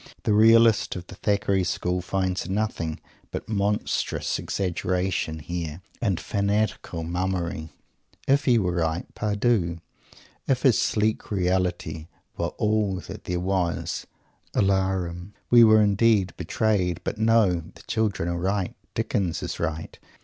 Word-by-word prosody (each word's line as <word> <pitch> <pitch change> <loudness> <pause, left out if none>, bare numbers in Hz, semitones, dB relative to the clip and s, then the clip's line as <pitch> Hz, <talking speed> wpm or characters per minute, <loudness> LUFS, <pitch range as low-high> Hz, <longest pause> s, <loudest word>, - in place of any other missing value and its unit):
The 105 - +2
realist 115 +1 +5
of 90 -1 -6
the - - -11
Thackeray 100 -1 +1
School 90 0 -1
finds 95 +1 -2
nothing 95 -6 -2 0.3
but - - -6
monstrous 105 -1 -1
exaggeration 90 -3 -1
here 85 +1 -5 0.2
and 100 -8 +1
fantastic 105 +1 -1
mummery. 85 -1 -2 0.6
If 140 +1 +3
he 125 -3 +5
were 90 -5 0
right, 80 +1 0
par 105 -1 -2
dieu! 100 -7 +1 0.7
If 130 -2 +1
his 130 -5 +5
sleek 110 0 0
"reality" 90 -4 -1 0.3
were - - -1
all 105 -2 +1
that - - -10
there 90 0 -1
was 90 -2 -1 0.5
"alarum!" 95 -2 0 0.2
We 120 -1 +9
were 110 -1 +7
indeed 100 -2 +3
"betrayed"! 90 -6 0
But 105 - -3
no; 110 -6 +3
the - - -15
children 105 -6 -1
are 85 0 -1
right. 95 +1 -1 0.2
Dickens 90 -5 -1
is - - -4
right. 80 -1 -4
95 Hz, 130 wpm, -25 LUFS, 90-105 Hz, 0.7 s, We